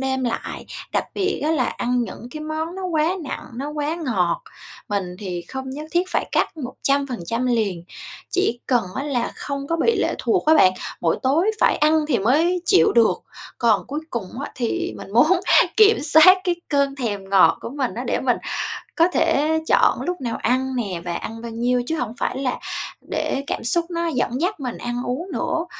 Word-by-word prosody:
đêm 265 Hz, -1 st, -1 dB
lại, 235 Hz, -, -4 dB, 0.3 s
đặc -, -, +1 dB
biệt 390 Hz, -1 st, -1 dB
á 310 Hz, -, +2 dB
là 300 Hz, -6 st, +2 dB
ăn 245 Hz, 0 st, -1 dB
những 230 Hz, +3 st, -9 dB
cái 305 Hz, -, -7 dB
món 315 Hz, +3 st, -4 dB
nó 380 Hz, -1 st, -5 dB
quá 330 Hz, 0 st, +1 dB
nặng, 270 Hz, -, -5 dB
nó 275 Hz, +4 st, -4 dB
quá 300 Hz, +1 st, -2 dB
ngọt, 210 Hz, -, 0 dB, 0.5 s
mình 185 Hz, -3 st, -2 dB
thì 180 Hz, -4 st, -4 dB
không 265 Hz, 0 st, -5 dB
nhất 295 Hz, +3 st, -6 dB
thiết 350 Hz, +1 st, +2 dB
phải -, -, -1 dB
cắt -, -, +1 dB
100% 255 Hz, -, -1 dB
liền, 205 Hz, -8 st, 0 dB, 0.5 s
chỉ 370 Hz, -10 st, +1 dB
cần 240 Hz, -5 st, +2 dB
á 270 Hz, -, -2 dB
là 265 Hz, -5 st, -1 dB
không 280 Hz, -1 st, -4 dB
có 330 Hz, -, 0 dB
bị 460 Hz, +8 st, +2 dB
lệ -, -, +1 dB
thuộc 375 Hz, -6 st, 0 dB
á 315 Hz, -, +6 dB
bạn, 185 Hz, -10 st, +6 dB, 0.3 s
mỗi 165 Hz, -, +1 dB
tối 315 Hz, +10 st, +3 dB
phải -, -, +4 dB
ăn 305 Hz, 0 st, +3 dB
thì 245 Hz, -7 st, +2 dB
mới 325 Hz, -, +2 dB
chịu 375 Hz, +1 st, +5 dB
được. 230 Hz, -2 st, +3 dB, 0.4 s
Còn 225 Hz, -4 st, +2 dB
cuối 290 Hz, +4 st, -4 dB
cùng 235 Hz, +2 st, -5 dB
á -, -, -5 dB
thì 345 Hz, +9 st, -2 dB
mình 195 Hz, -, -10 dB
muốn 320 Hz, +10 st, +5 dB, 0.4 s
kiểm 435 Hz, 0 st, +7 dB
soát 355 Hz, +5 st, +7 dB
cái 355 Hz, -1 st, +2 dB
cơn 280 Hz, -1 st, +1 dB
thèm 205 Hz, -6 st, -4 dB
ngọt 195 Hz, -1 st, +5 dB
của -, -, -6 dB
mình 270 Hz, -1 st, -2 dB
á, -, -, -4 dB
để -, -, 0 dB
mình -, -, +2 dB, 0.6 s
có 335 Hz, 0 st, +5 dB
thể 320 Hz, -2 st, +2 dB
chọn -, -, +3 dB
lúc 355 Hz, -4 st, -3 dB
nào 235 Hz, -2 st, -2 dB
ăn 260 Hz, +3 st, 0 dB
nè 195 Hz, -8 st, -3 dB
và 175 Hz, -, -2 dB
ăn 225 Hz, +6 st, -6 dB
bao 235 Hz, -, -6 dB
nhiêu 245 Hz, +2 st, +1 dB
chứ 320 Hz, -, -1 dB
hổng 230 Hz, -2 st, -3 dB
phải 255 Hz, -, -2 dB
là 260 Hz, -2 st, -2 dB, 0.5 s
để 275 Hz, -, -1 dB
cảm -, -, -3 dB
xúc 335 Hz, +8 st, +1 dB
nó 335 Hz, 0 st, -1 dB
dẫn 255 Hz, -2 st, -1 dB
dắt 365 Hz, -1 st, -1 dB
mình 250 Hz, -3 st, -4 dB
ăn 240 Hz, +1 st, -3 dB
uống 335 Hz, +10 st, -3 dB
nữa, 330 Hz, 0 st, -1 dB
265 Hz, 200 wpm, -22 LUFS, 235-320 Hz, 0.6 s, kiểm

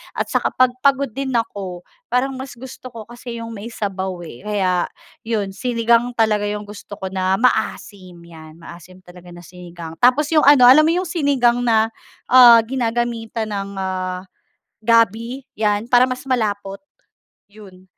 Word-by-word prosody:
at -, -, -1 dB
saka -, -, -1 dB
pag 255 Hz, -1 st, +4 dB
pagod 275 Hz, -2 st, +1 dB
din 265 Hz, 0 st, -4 dB
ako, 195 Hz, -6 st, -3 dB, 0.2 s
parang 260 Hz, +2 st, 0 dB
mas 265 Hz, -1 st, -8 dB
gusto 255 Hz, +1 st, -11 dB
ko 230 Hz, -3 st, -10 dB
kasi 240 Hz, 0 st, -9 dB
'yung 230 Hz, 0 st, -7 dB
may 215 Hz, 0 st, -8 dB
sabaw, 190 Hz, -5 st, -5 dB
eh. 120 Hz, -, -11 dB
Kaya 185 Hz, -4 st, 0 dB, 0.4 s
'yun 210 Hz, -4 st, -2 dB
sinigang 235 Hz, +2 st, 0 dB
talaga 210 Hz, -2 st, +1 dB
'yung 210 Hz, 0 st, -4 dB
gusto 205 Hz, 0 st, -10 dB
ko 190 Hz, -1 st, -7 dB
na 190 Hz, 0 st, 0 dB
maasim 200 Hz, -6 st, -2 dB
'yan 160 Hz, -2 st, -14 dB
maasim 175 Hz, +2 st, -13 dB
talaga 180 Hz, 0 st, -15 dB
na 175 Hz, -, -12 dB
sinigang, 170 Hz, -2 st, -11 dB
tapos 285 Hz, +5 st, +3 dB
'yung 305 Hz, -3 st, +3 dB
ano, 285 Hz, -3 st, +7 dB
alam 305 Hz, +5 st, +7 dB
mo -, -, +3 dB
'yung 365 Hz, -, -1 dB
sinigang 270 Hz, -7 st, +1 dB
na, 225 Hz, -1 st, +2 dB, 0.4 s
ah, 240 Hz, -3 st, +8 dB
ginagamitan 230 Hz, -2 st, -3 dB
ng, 200 Hz, -1 st, -5 dB
ah, 185 Hz, -1 st, -4 dB, 0.6 s
gabi 230 Hz, +3 st, +1 dB
'yan 210 Hz, 0 st, 0 dB
para 250 Hz, +1 st, +5 dB
mas 255 Hz, +2 st, -6 dB
malapot 205 Hz, -5 st, -2 dB, 0.7 s
'yun, 195 Hz, -3 st, -15 dB
220 Hz, 155 wpm, -19 LUFS, 190-245 Hz, 0.7 s, ah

